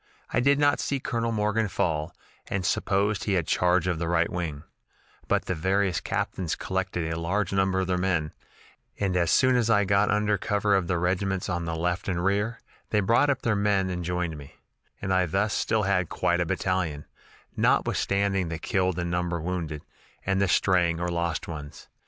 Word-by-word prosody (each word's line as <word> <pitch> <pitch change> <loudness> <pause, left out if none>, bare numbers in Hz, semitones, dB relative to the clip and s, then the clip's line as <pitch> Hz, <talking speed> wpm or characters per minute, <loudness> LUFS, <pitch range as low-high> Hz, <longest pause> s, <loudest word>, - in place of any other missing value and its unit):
I - - +2
did 140 +3 +4
not 145 0 +3
see 140 - -1
Colonel 115 -2 -2
Morgan 105 0 +1
fall, 80 -4 -1 0.4
and 95 -2 -2
supposed 100 +1 0
he 100 - 0
had 90 -4 +1
charge 90 +1 +2
of 90 -3 -1
the 85 - -2
right 85 0 +1
wing; 80 -5 -4 0.6
but - - +1
the - - -1
various 95 +2 +1
captains 90 -4 -2
collected 95 -3 -2
a 80 - -3
large 95 +3 -1
number 95 -1 +2
of - - 0
their 90 0 0
men, 90 -5 0 0.7
and 95 -3 0
as 85 -2 +2
soon 130 -1 +4
as 120 -2 +2
I 105 -2 +4
got 100 +2 +3
under 105 -1 +1
cover 105 +1 +1
of 95 -3 +2
the 90 - 0
regiments 95 +2 -1
on 85 -1 -2
the 80 0 -2
left 90 +2 -2
and 90 -1 -1
rear, 105 +4 0 0.3
they 105 - +2
brought 115 +8 +3 0.2
their 115 -2 +2
men 100 -2 +1
up - - -2
and 90 0 -4
joined 90 -2 -2
me, 70 - -13 0.4
and 95 -1 -1
I 90 -1 +2
thus 100 +5 0
had - - +1
still 100 -4 +1
quite 90 +1 0
a 85 - -1
battalion, 85 -5 -1 0.5
notwithstanding 100 -2 +1
the 80 - -3
killed 95 +1 0
and 85 -1 -2
number 85 -1 -1
wounded, 80 -3 -4 0.4
and 95 0 +1
the 100 - +3
straying 85 -2 +2
or 90 0 -1
lost 85 -2 -2
ones. 75 -3 -8
95 Hz, 195 wpm, -26 LUFS, 85-100 Hz, 0.7 s, did